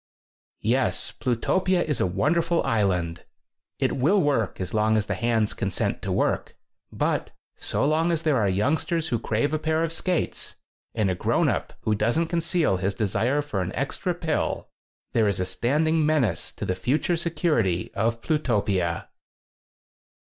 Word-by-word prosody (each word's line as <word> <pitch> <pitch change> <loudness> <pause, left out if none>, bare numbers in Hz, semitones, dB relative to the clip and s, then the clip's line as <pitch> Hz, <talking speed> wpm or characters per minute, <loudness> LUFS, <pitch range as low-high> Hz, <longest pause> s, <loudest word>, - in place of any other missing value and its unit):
Yes, 125 +4 +1
Plutopia 175 +9 +1
is 150 -5 -1
a - - +3
wonderful 165 - +1
island. 90 -6 0 0.5
It - - 0
will 160 +11 +3
work 140 - +1
as 95 - -4
long 110 0 +3
as 105 - 0
the - - -2
hands 115 -3 +1
con 100 - -2
sent 95 - -1
to - - -3
work. - - 0 0.4
But - - -1 0.3
so - - -1
long 160 +3 +2
as 165 -1 -1
there 155 -4 +3
are 105 -4 +2
youngsters 155 - 0
who 120 - 0
crave 115 +9 0
a 155 - +1
pair 160 +1 +1
of 165 0 -1
skates 180 +1 -2 0.4
and 105 -4 +1
a - - +1
grown 90 - +1
up - - -2
who 110 - +1
doesn't 120 +11 +1
conceal 170 - +1
his 95 +2 -1
desire 120 +7 +1
for 105 -10 -2
an 90 0 -3
extra 170 +6 -2
pill, 165 -3 -2 0.4
there 110 -2 +3
is 100 -2 0
a 90 - 0
standing 155 - +1
menace 140 - +1
to - - -5
the 95 - 0
future 130 - 0
security 150 - 0
of 115 +1 0
Plutopia. 100 - 0
125 Hz, 165 wpm, -25 LUFS, 105-160 Hz, 0.5 s, a